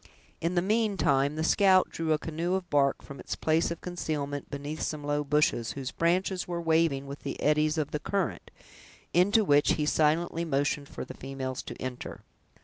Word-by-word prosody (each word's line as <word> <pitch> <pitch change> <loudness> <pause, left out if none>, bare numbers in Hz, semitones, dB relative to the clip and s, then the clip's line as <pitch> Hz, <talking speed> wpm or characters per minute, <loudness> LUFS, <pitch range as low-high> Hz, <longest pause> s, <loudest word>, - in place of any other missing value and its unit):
In 170 +2 -1
the 175 - +2
meantime, 190 -10 +2
the 160 - -2
scout 185 +2 +4
drew 165 -1 -2
a 155 - +4
canoe 165 +4 -2
of 190 -2 -3
bark 140 -1 +2
from 140 -1 -10
its - - -4
place 160 +1 +1
of 170 -1 -5
concealment 150 -5 -4
beneath 145 +2 -5
some 150 -1 -3
low 145 0 0
bushes, 145 -5 +1
whose 135 -2 -5
branches 180 +2 0
were 175 -1 -3
waving 160 -4 +2
with 140 +1 -7
the - - -6
eddies 150 +1 +2
of 150 -2 -1
the 150 - -2
current, 195 +4 -2 0.6
into 200 +5 +4
which 145 -3 +4
he 150 - -1
silently 160 +2 +1
motioned 145 -2 -1
for - - -6
the - - -8
females 130 -1 -5
to - - -9
enter. 130 -1 -6
155 Hz, 185 wpm, -28 LUFS, 145-175 Hz, 0.6 s, scout